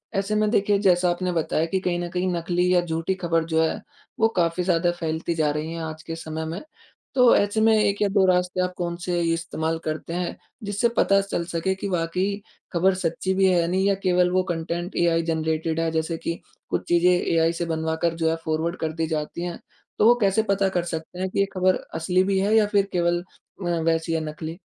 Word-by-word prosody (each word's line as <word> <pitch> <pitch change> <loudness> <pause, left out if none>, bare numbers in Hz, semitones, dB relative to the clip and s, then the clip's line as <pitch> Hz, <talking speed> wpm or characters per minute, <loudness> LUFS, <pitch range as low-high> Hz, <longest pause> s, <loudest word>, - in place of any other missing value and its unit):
ऐसे 195 +2 0
में 215 0 +2
देखिए 205 -2 +2
जैसा 180 -3 +3
आपने 180 +1 -1
बताया 165 -1 0
कि 190 +3 -1
कहीं 180 -2 -1
न 175 0 -3
कहीं 180 +1 -1
नकली 175 +1 +1
या 180 - +4
झूठी 165 +1 -2
ख़बर 165 -2 +1
जो 160 0 +1
हैं 160 - -1 0.4
वो 225 - +5
काफ़ी 170 +1 +1
ज़्यादा 175 -1 +2
फैलती 160 +1 -2
जा 155 -2 +1
रही 150 +2 -3
है 165 - -5
आज 160 0 -6
के 165 - -5
समय 160 -1 -5
में। 165 +3 -5 0.5
तो 250 -2 +6
ऐसे 205 +2 +1
में 225 0 +5
1 205 -1 +1
या 205 - +4
2 195 -2 +4
रास्ते 180 0 +2
आप 180 0 -1
कौन 170 -1 -2
से 180 - -2
ये 165 0 +1
इस्तेमाल 165 -1 -2
करते 155 +2 -4
हैं, 175 0 -2 0.3
जिससे 205 +3 +1
पता 195 0 +4
चल 195 -3 -3
सके 180 +3 0
कि 190 - -5
वाक़ई 180 +3 -1 0.3
ख़बर 185 +2 +3
सच्ची 170 +3 -1
भी 190 0 +3
है 170 -2 +2
नहीं 190 +2 +1
या 200 - +3
केवल 180 -1 +3
वो 185 0 +2
कंटेंट 170 +2 -4
एआई 170 -1 +3
जनरेटेड 160 0 -1
है 165 0 +1
जैसे 160 +1 -1
कि 165 +1 -4 0.3
कुछ - - -1
चीज़ें 175 +1 +4
एआई 165 -2 +2
से - - +1
बनवाकर 160 0 -1
जो 165 -1 +1
है 165 - +1
फॉरवर्ड 160 +2 -1
कर 160 -1 -2
दी 160 0 -2
जाती 155 +2 -3
हैं। 175 -1 -5 0.4
तो - - +5
वो 240 - +7
कैसे 200 +2 +3
पता 195 0 +2
कर 180 -2 -1
सकते 165 +1 -6
हैं 190 0 -1
कि 185 - -3
ये 195 - +4
खबर 185 -1 +3 0.2
असली 180 +3 +2
भी 195 0 +1
है 205 +3 +2
या 220 -1 +5
फिर 200 -1 +4
केवल 175 -1 +1 0.4
अ, - - -4 0.2
वैसी 165 0 0
है 165 - +1
नकली? 160 +2 -7
175 Hz, 225 wpm, -24 LUFS, 165-190 Hz, 0.5 s, वो